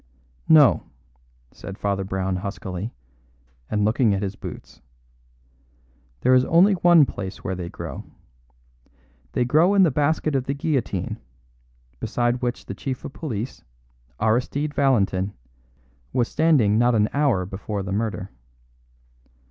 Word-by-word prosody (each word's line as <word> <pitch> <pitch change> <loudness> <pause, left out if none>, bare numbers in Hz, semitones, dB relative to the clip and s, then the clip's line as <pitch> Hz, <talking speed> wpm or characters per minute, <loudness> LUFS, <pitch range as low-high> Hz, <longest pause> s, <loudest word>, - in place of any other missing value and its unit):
"No," 150 -5 +5 0.6
said 100 0 -9
Father 100 -1 -1
Brown 95 0 -2
huskily, 95 +2 -5 0.8
and 105 -1 +1
looking 110 -1 +2
at 100 - -3
his 100 0 -3
boots; - - -10 1.4
"there 130 - +4
is 130 0 +5
only 185 +5 +5
one 175 -4 +6
place 95 -6 -7
where 95 - -2
they 90 -2 -5
grow. - - -7 1.3
They 125 - +1
grow 160 +10 +4
in 195 - +6
the 165 - +4
basket 150 +2 0
of 135 -2 0
the 140 - -2
guillotine, 135 - -2 0.8
beside 120 +2 -1
which 125 0 -3
the - - -6
chief 130 -3 -5
of 135 - -7
police, 125 -7 -5 0.6
Aristide 125 +7 0
Valentin, 100 -8 +1 0.8
was 120 -2 +1
standing 130 -10 +3
not 120 0 +3
an 105 -1 +3
hour 140 -11 +2
before 100 +2 -5
the 95 - -5
murder. 105 -3 -3
120 Hz, 130 wpm, -23 LUFS, 100-140 Hz, 1.4 s, one